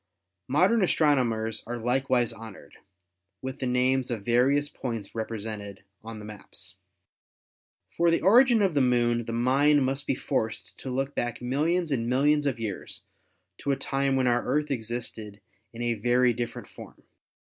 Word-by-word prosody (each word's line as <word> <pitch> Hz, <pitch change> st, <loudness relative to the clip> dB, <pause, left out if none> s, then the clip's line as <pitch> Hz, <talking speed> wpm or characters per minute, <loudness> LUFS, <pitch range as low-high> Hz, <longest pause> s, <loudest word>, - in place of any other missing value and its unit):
Modern 185 Hz, -, +3 dB
astronomers 120 Hz, -, +1 dB
are 120 Hz, +1 st, -3 dB
likewise 125 Hz, 0 st, +1 dB
honored 110 Hz, -10 st, -12 dB, 0.7 s
with 130 Hz, +1 st, -5 dB
the 130 Hz, -, -2 dB
names 125 Hz, +1 st, +1 dB
of 110 Hz, -5 st, -4 dB
various 135 Hz, +5 st, +3 dB
points 115 Hz, -8 st, -6 dB
represented 110 Hz, -3 st, -6 dB, 0.2 s
on 115 Hz, 0 st, -8 dB
the 105 Hz, -, -9 dB
maps. 105 Hz, -1 st, -10 dB, 1.1 s
For 170 Hz, 0 st, +2 dB
the 165 Hz, -, +2 dB
origin 235 Hz, +3 st, +6 dB
of 190 Hz, -4 st, +2 dB
the 140 Hz, -, +2 dB
Moon 120 Hz, -2 st, +2 dB
the 115 Hz, -, -5 dB
mind 135 Hz, +4 st, +3 dB
must 135 Hz, +1 st, -2 dB
be -, -, +1 dB
forced 110 Hz, -5 st, -3 dB
to 130 Hz, -, -6 dB
look 135 Hz, +2 st, -2 dB
back 120 Hz, -1 st, -2 dB
millions 155 Hz, +7 st, 0 dB
and 120 Hz, -3 st, -1 dB
millions 145 Hz, +3 st, +2 dB
of 130 Hz, -4 st, -1 dB
years 105 Hz, -4 st, -6 dB, 0.6 s
to 140 Hz, -, -1 dB
a -, -, +2 dB
time 135 Hz, 0 st, 0 dB
when 130 Hz, -1 st, +2 dB
our 120 Hz, 0 st, +2 dB
Earth 150 Hz, 0 st, -1 dB
existed 110 Hz, -4 st, -4 dB, 0.3 s
in 120 Hz, +1 st, -6 dB
a 120 Hz, 0 st, +1 dB
very 120 Hz, +3 st, +2 dB
different 120 Hz, 0 st, -5 dB
form. -, -, -13 dB
125 Hz, 160 wpm, -27 LUFS, 115-140 Hz, 1.1 s, origin